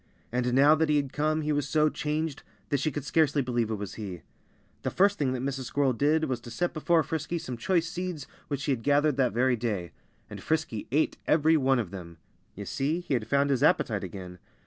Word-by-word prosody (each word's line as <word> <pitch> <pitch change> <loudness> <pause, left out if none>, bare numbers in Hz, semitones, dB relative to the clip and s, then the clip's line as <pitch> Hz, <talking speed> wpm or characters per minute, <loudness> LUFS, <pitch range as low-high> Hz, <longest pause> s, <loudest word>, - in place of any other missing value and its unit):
And 125 0 0
now 140 +3 +7
that 160 0 +1
he 150 - +3
had 140 -2 0
come 155 +1 +1
he 150 0 -1
was 145 -1 -1
so 155 -1 +3
changed 150 0 -2 0.3
that 145 - +1
she 155 - 0
could 145 0 -5
scarcely 150 -2 +2
believe 120 -3 -1
it 110 - -1
was 100 -2 -6
he. 90 -5 -6 0.6
The - - -1
first 200 +2 +2
thing 135 -3 +1
that 125 -1 -3
Mrs. 135 -1 -3
Squirrel 135 +1 +1
did 150 +6 +2
was 130 -5 -1
to 120 - -11
set 175 +10 -2
before 165 +1 +2
Frisky 160 +2 -3
some 130 -6 -5
choice 165 +8 +1
seeds 180 -4 -4 0.2
which 140 -2 -3
she 145 - -1
had 125 -4 -1
gathered 145 +2 +3
that 130 -3 +2
very 125 +2 +2
day. 105 -7 -3 0.4
And - - -9
Frisky 155 -9 -2
ate 150 +4 +1
every 160 +1 +4
one 135 -3 +3
of 110 -7 -2
them. 85 -4 -9 0.4
You 100 - -7
see, 150 - -1
he 175 - -3
had 115 -4 -1
found 140 +2 +2
his 130 - +1
appetite - - +2
again. 90 -2 -8
140 Hz, 225 wpm, -28 LUFS, 120-155 Hz, 0.6 s, now